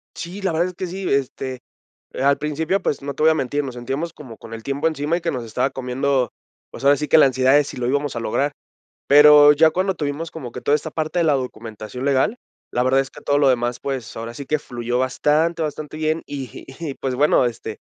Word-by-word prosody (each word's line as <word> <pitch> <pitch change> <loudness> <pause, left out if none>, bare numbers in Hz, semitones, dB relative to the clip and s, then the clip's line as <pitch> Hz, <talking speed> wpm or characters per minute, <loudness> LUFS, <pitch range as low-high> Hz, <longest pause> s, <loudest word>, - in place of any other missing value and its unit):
Sí, 180 +4 -7
la 190 -2 0
verdad 165 +2 +1
es - - -10
que 185 +1 -5
sí. 190 +2 -4
Este, 130 -1 -2 0.5
eh, - - -5
al 140 0 +4
principio, 155 +6 -1
pues, 145 - -1
no 140 0 -4
te 150 - -3
voy 160 - +7
a - - +3
mentir, 145 0 -1
nos 130 -3 -6
sentíamos 135 +7 -4
como 130 -9 -11
con 115 - -11
el 115 - -8
tiempo 140 +5 -1
encima 155 +1 -1
y 175 - -6
que 165 - -1
nos 125 -4 -4
estaba 115 +4 -1
comiendo, 130 0 -1 0.4
pues, - - -10
ahora 140 +1 +6
sí 150 - -3
que 145 - +5
la 155 - +8
ansiedad 130 0 +3
de 145 - +6
si 140 - -8
lo 125 -1 -2
íbamos 145 0 -1
a - - -2
lograr. 140 +5 -1 0.5
Pero 150 0 +8
ya 160 +2 +5
cuando 185 +2 0
tuvimos 150 +2 -4
como 130 -7 -7
que 125 - -8
toda 145 +4 +3
esta 150 +1 -4
parte 155 +3 -2
de - - +3
la 155 - +4
documentación 115 -2 -5
legal, 140 - +2 0.3
la 125 - +1
verdad 130 +1 +3
es 135 -1 -1
que - - -14
todo 145 0 +1
lo 140 -2 +4
demás, 120 -1 0
pues, 130 -5 -5
ahora 115 +1 -6
sí 140 +4 -8
que 155 +2 0
fluyó 120 -2 -3
bastante, 150 +6 +1
bastante 155 0 -4
bien, 155 +1 0
y 135 -3 -7
y, 160 -5 -4
pues, 130 -2 -3
bueno, 145 -2 +4
este, 115 -2 -5
140 Hz, 245 wpm, -21 LUFS, 125-155 Hz, 0.5 s, la